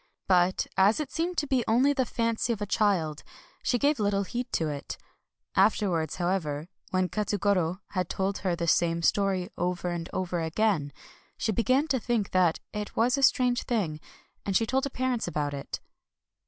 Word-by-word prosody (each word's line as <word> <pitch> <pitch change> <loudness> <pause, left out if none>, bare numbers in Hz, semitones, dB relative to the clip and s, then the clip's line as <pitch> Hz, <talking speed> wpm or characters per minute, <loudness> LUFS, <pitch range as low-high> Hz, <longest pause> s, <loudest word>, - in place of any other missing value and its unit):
But 180 0 +3
as 200 +6 +4
it 300 -3 -4
seemed 345 +2 -2
to 295 - +1
be 265 -4 +1
only 255 +6 +4
the 260 -3 0
fancy 230 0 0
of 225 - -2
a 205 - -2
child, 190 -8 +1 0.4
she 245 - +1
gave 285 +2 +2
little 200 -1 +1
heed 245 +6 -4
to 160 - +1
it. 145 -2 -5 0.6
Afterwards, 175 -8 +2
however, 175 -4 -2 0.2
when 185 0 +1
Katsugoro 200 -3 0
had 185 -3 -2
told 195 +1 -1
her 180 -3 0
the 170 0 -3
same 170 0 +2
story 190 -1 +1
over 180 0 -1
and 170 -1 -4
over 180 -2 -2
again, 160 -3 0 0.5
she 220 - 0
began 255 +8 +2
to 265 - +2
think 230 -4 -1
that 180 -3 +3
it 210 0 -5
was 245 +3 +3
a 275 - -2
strange 250 -2 +3
thing, 185 -11 -1 0.4
and 195 -2 +2
she 225 - +1
told 265 +4 0
her - - -2
parents 255 -4 -1
about 145 -4 -2
it. 140 -1 -5
200 Hz, 180 wpm, -28 LUFS, 175-235 Hz, 0.6 s, as